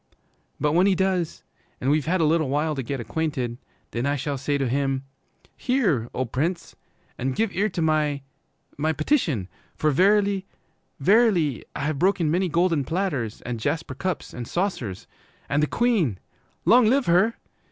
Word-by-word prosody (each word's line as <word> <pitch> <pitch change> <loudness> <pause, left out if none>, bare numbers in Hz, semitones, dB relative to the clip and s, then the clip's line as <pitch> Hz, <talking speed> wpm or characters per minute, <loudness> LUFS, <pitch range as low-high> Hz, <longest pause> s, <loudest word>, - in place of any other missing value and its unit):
'But 150 +1 +1
when 180 +5 +4
he 195 - +3
does, 185 -3 -1 0.4
and 135 - +1
we've 150 0 +1
had 185 +1 +2
a - - +4
little 155 -2 +2
while 150 +3 0
to 135 - -3
get 135 +2 -4
acquainted, 125 -1 -2 0.3
then 120 +4 -1
I 145 - +1
shall 145 +1 -2
say 140 +2 -1
to 135 -2 0
him, 135 +1 0 0.5
"Hear, 190 - +1
O 130 - 0
Prince, 155 +9 -2 0.4
and 130 +1 -1
give 220 -2 +1
ear 205 +3 +2
to 175 -3 -2
my 150 -3 +1 0.6
my 155 +2 +1
petition! 155 - 0 0.3
For 155 - +1
verily, 195 +4 +3 0.5
verily, 180 - +3
I - - -3
have 145 0 -1
broken 180 -3 +2
many 180 +2 +1
golden 170 -2 +2
platters 145 - -2
and 120 -1 -4
jasper 160 +5 -2
cups 185 +5 -4
and 120 -2 -6
saucers, 155 - -2 0.4
and 145 +1 +1
the 150 - +2
Queen, 200 - +1 0.5
long 240 -1 +6
live 265 +4 +3
her! 185 +7 +3
155 Hz, 165 wpm, -24 LUFS, 135-190 Hz, 0.6 s, long